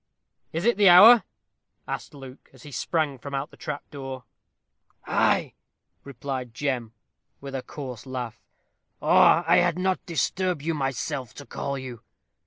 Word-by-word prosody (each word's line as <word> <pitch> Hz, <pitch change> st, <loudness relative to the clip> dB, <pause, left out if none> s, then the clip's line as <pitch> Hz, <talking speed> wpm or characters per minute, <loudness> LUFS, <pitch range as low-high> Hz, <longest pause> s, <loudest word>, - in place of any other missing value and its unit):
"Is 165 Hz, +4 st, -3 dB
it 235 Hz, -3 st, +3 dB
the 205 Hz, -2 st, +6 dB
hour?" 215 Hz, +7 st, +9 dB, 0.6 s
asked -, -, -6 dB
Luke, 135 Hz, -1 st, -12 dB
as 130 Hz, -, -17 dB
he 145 Hz, -, -11 dB
sprang 145 Hz, 0 st, -1 dB
from 140 Hz, +2 st, -6 dB
out 135 Hz, +2 st, -4 dB
the -, -, -15 dB
trap 145 Hz, -1 st, -6 dB
door. 135 Hz, -3 st, -7 dB, 0.8 s
"Ay," -, -, +1 dB, 0.5 s
replied 130 Hz, -3 st, -6 dB
Jem, 125 Hz, -5 st, -2 dB, 0.5 s
with 135 Hz, -1 st, -9 dB
a 135 Hz, -, -3 dB
coarse 125 Hz, -4 st, -8 dB
laugh, 125 Hz, -3 st, -6 dB, 0.6 s
"or -, -, +5 dB
I -, -, +5 dB
had -, -, +2 dB
not 185 Hz, 0 st, 0 dB
disturbed 175 Hz, -1 st, -1 dB
myself 135 Hz, -4 st, -3 dB
to 145 Hz, -, -10 dB
call 140 Hz, 0 st, -4 dB
you. 125 Hz, -4 st, -8 dB
140 Hz, 145 wpm, -25 LUFS, 130-160 Hz, 0.8 s, hour